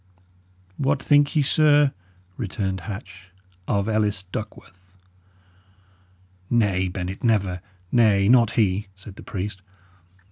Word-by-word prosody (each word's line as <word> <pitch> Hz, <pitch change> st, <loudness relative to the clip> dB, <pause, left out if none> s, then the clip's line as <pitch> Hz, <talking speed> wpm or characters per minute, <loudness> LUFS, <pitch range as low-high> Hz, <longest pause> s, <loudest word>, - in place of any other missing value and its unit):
"What 140 Hz, 0 st, +1 dB
think 145 Hz, +1 st, +3 dB
ye, 150 Hz, -, +3 dB
sir," 145 Hz, -1 st, +4 dB, 0.4 s
returned 95 Hz, -3 st, -3 dB
Hatch, 95 Hz, -3 st, -9 dB, 0.4 s
"of 100 Hz, 0 st, 0 dB
Ellis 105 Hz, -2 st, 0 dB
Duckworth?" 95 Hz, -2 st, -9 dB, 1.5 s
"Nay, 100 Hz, -6 st, +1 dB
Bennet, 90 Hz, +1 st, -5 dB
never. 100 Hz, -6 st, +1 dB, 0.3 s
Nay, 105 Hz, -5 st, +4 dB
not 115 Hz, -1 st, +4 dB
he," 100 Hz, -1 st, +1 dB
said 95 Hz, +1 st, -12 dB
the -, -, -11 dB
priest. 100 Hz, +1 st, -5 dB
105 Hz, 105 wpm, -23 LUFS, 95-120 Hz, 1.5 s, sir